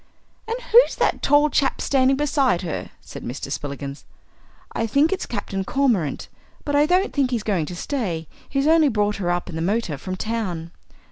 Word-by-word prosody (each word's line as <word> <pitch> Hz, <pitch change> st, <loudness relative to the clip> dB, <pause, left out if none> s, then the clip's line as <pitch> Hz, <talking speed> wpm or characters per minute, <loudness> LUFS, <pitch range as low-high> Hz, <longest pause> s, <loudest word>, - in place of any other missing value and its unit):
"And 460 Hz, +2 st, -2 dB
who's 480 Hz, +3 st, +7 dB
that -, -, +1 dB
tall 290 Hz, +1 st, +4 dB
chap 275 Hz, -, +1 dB
standing 265 Hz, -1 st, +2 dB
beside 275 Hz, -, +1 dB
her?" 165 Hz, -, -4 dB
said -, -, -10 dB
Mr. 135 Hz, +3 st, -5 dB
Spillikins. 140 Hz, -1 st, -5 dB, 0.7 s
"I 230 Hz, -, -1 dB
think 290 Hz, -, +3 dB
it's 375 Hz, -, -4 dB
Captain 200 Hz, -3 st, -3 dB
Cormorant, 220 Hz, -, 0 dB, 0.4 s
but 285 Hz, -, 0 dB
I 295 Hz, +1 st, +4 dB
don't 365 Hz, +4 st, +2 dB
think 275 Hz, -3 st, +2 dB
he's 235 Hz, -4 st, -1 dB
going 185 Hz, -8 st, 0 dB
to 180 Hz, -, -6 dB
stay. 175 Hz, -, -3 dB, 0.2 s
He's 275 Hz, 0 st, 0 dB
only 315 Hz, -1 st, +5 dB
brought 210 Hz, -3 st, 0 dB
her 180 Hz, -3 st, -2 dB
up 175 Hz, 0 st, -1 dB
in 175 Hz, -, -7 dB
the 160 Hz, -, -3 dB
motor 180 Hz, -5 st, -1 dB
from 185 Hz, +5 st, -4 dB
town." 185 Hz, -6 st, -3 dB
225 Hz, 185 wpm, -23 LUFS, 175-285 Hz, 0.7 s, who's